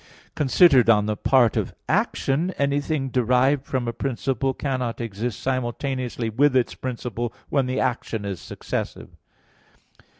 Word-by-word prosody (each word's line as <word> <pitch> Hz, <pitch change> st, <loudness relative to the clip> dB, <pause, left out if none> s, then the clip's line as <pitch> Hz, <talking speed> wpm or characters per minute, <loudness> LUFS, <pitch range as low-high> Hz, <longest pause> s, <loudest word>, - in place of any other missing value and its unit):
Considered 135 Hz, -3 st, +5 dB
on 105 Hz, -2 st, +5 dB
the 105 Hz, 0 st, -1 dB
part 120 Hz, +1 st, +3 dB
of -, -, -2 dB
action, 150 Hz, +7 st, +1 dB
anything 140 Hz, 0 st, 0 dB
derived 130 Hz, +3 st, +2 dB
from 130 Hz, -3 st, -2 dB
a 115 Hz, -, -2 dB
principle 135 Hz, +1 st, -1 dB
cannot 130 Hz, -3 st, -3 dB
exist 115 Hz, -2 st, -4 dB
simultaneously 130 Hz, -1 st, -2 dB
with 130 Hz, +5 st, +2 dB
its 125 Hz, -2 st, +2 dB
principle 120 Hz, -2 st, -4 dB, 0.2 s
when 135 Hz, -3 st, +1 dB
the 130 Hz, +1 st, -1 dB
action 120 Hz, -4 st, -2 dB
is 100 Hz, -3 st, -4 dB
successive. -, -, -5 dB
130 Hz, 130 wpm, -24 LUFS, 115-135 Hz, 0.2 s, Considered